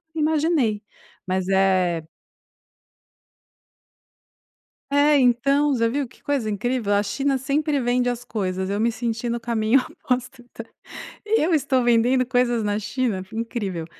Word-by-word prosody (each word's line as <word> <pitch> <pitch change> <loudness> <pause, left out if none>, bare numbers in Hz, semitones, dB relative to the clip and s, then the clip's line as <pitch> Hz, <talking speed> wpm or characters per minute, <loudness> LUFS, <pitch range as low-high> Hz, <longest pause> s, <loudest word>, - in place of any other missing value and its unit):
imaginei, 305 -8 +1 0.5
mas 185 0 -1
é 185 -3 +2 2.9
É, 290 +1 +4
então, 275 +4 +3
você 230 -3 +1
viu 275 +2 -2
que - - -23
coisa 275 -7 -1
incrível? 215 0 -1
A 205 0 +2
China 270 +6 -1
sempre 290 +3 0
vende 245 0 +1
as 245 0 -4
coisas. 190 -5 -3
Eu 200 +1 -1
me 230 +2 +2
senti 230 0 -3
no 235 0 -1
caminho 230 +2 +2
oposto 250 0 -4
do 240 - -30 0.8
"Eu 390 -6 +2
estou 270 -4 +1
vendendo 240 +2 +3
coisas 245 -2 +1
na 205 0 -1
China? 215 -1 -2
Incrível." 210 -7 -4
240 Hz, 130 wpm, -23 LUFS, 215-270 Hz, 2.9 s, É